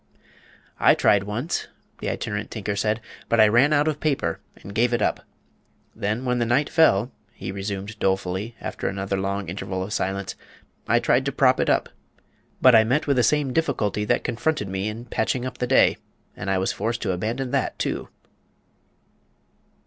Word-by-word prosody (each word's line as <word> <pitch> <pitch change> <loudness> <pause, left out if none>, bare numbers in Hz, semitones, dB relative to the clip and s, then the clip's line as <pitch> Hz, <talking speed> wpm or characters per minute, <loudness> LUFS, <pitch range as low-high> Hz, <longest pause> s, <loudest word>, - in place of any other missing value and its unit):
"I - - +6
tried 100 -1 +3
once," 120 +11 -3 0.3
the - - -3
Itinerant 105 +1 -3
Tinker 105 -2 -3
said, 105 +2 0 0.3
"but 115 - +2
I 110 - +8
ran 120 +7 +4
out 150 0 +3
of 150 -2 -1
paper 150 -3 -1 0.2
and 100 - -10
gave 120 +3 +2
it 120 - -2
up. - - +1 0.8
Then, 110 +5 -2
when 125 -1 +1
the - - +2
night 130 +5 +1
fell," 125 - +4 0.2
he 95 -1 -6
resumed 100 +2 -5
dolefully, 95 +3 -1
after - - -4
another 95 0 -2
long 100 +1 -2
interval 95 +1 -4
of 100 +2 -5
silence, 100 -1 -2 0.5
"I - - +4
tried - - +2
to - - 0
prop - - +3
it - - +1
up. - - +2 0.8
But 130 0 +8
I 110 -1 +7
met 130 +7 +1
with 140 -2 +1
the - - +5
same 135 +2 +2
difficulty 125 -10 0
that - - +1
confronted 145 0 -1
me 95 +1 -2
in 110 +3 -5
patching 125 +1 -1
up 130 - -6
the 125 - 0
day, 130 - +4 0.4
and 95 - -5
was 95 - 0
forced 115 +3 -3
to 100 - 0
abandon 115 +8 -2
that 140 -1 -1
too." - - -3
110 Hz, 180 wpm, -24 LUFS, 100-125 Hz, 0.8 s, I